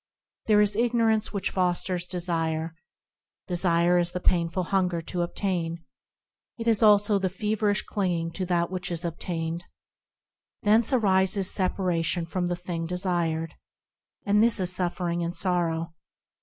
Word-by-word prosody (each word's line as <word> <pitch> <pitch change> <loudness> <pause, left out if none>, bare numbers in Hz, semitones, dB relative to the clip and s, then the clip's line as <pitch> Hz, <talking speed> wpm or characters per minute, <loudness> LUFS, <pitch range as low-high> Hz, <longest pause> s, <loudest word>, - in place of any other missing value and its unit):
There 210 -1 +5
is 205 -1 +2
ignorance 230 -1 +2
which 200 -2 -2
fosters 180 -1 0
desire; 165 -3 -1 0.7
Desire 175 -1 +3
is 175 0 0
the 180 - -2
painful 175 0 +1
hunger 180 -2 0
to 175 +2 -4
obtain; 170 -2 -3 0.7
It 230 -1 -5
is 225 -3 +3
also 205 -1 +5
the 190 -1 0
feverish 210 +1 0
clinging 175 -5 -2
to 185 +2 -3
that 175 -1 0
which 180 -1 -3
is 170 +1 -3
obtained; 165 0 -4 1.0
Thence 220 +4 +3
arises 190 -5 +3
separation 180 -3 -1
from 175 +2 -2
the 175 - -1
thing 175 -2 -5
desired, 170 -3 -2 0.7
And 205 0 +3
this 230 -2 +4
is 180 -1 +1
suffering 175 -1 -2
and 170 +1 -3
sorrow. 170 -3 -1
180 Hz, 135 wpm, -26 LUFS, 170-200 Hz, 1.0 s, There